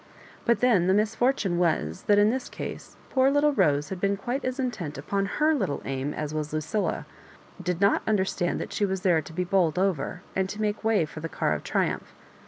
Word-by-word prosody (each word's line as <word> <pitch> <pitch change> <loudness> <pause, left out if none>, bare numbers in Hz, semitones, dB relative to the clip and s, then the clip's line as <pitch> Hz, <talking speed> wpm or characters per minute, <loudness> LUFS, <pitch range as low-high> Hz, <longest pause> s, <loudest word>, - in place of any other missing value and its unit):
But 235 - +2
then 215 -8 +4
the 190 - +4
misfortune 215 -3 +1
was, 85 - 0
that 205 - +5
in 205 +1 +5
this 260 +1 -3
case - - -7
poor 265 0 +4
little 290 +1 +3
Rose 145 - +2
had 190 -2 -5
been 200 0 +1
quite 245 +7 -3
as 255 +1 -2
intent 195 - -3
upon 195 +8 -1
her 310 +1 +4
little 195 - -1
aim 135 +1 -2
as 150 0 -4
was 150 -1 -3
Lucilla, 155 +8 -1 0.5
and - - -11
did 180 -1 0
not 200 - +4
under 205 -3 +2
stand 175 -2 -1
that - - -5
she - - -1
was 190 -2 0
there 175 -4 +3
to 150 - -11
be 180 +3 -1
bowled 180 -4 +2
over, 180 -1 -1
and 190 0 0
to 210 - -6
make 210 0 -1
way 215 -6 +3
for 155 +1 -9
the 165 +1 -5
car - - 0
of - - -4
triumph. - - -1
190 Hz, 220 wpm, -27 LUFS, 165-220 Hz, 0.5 s, that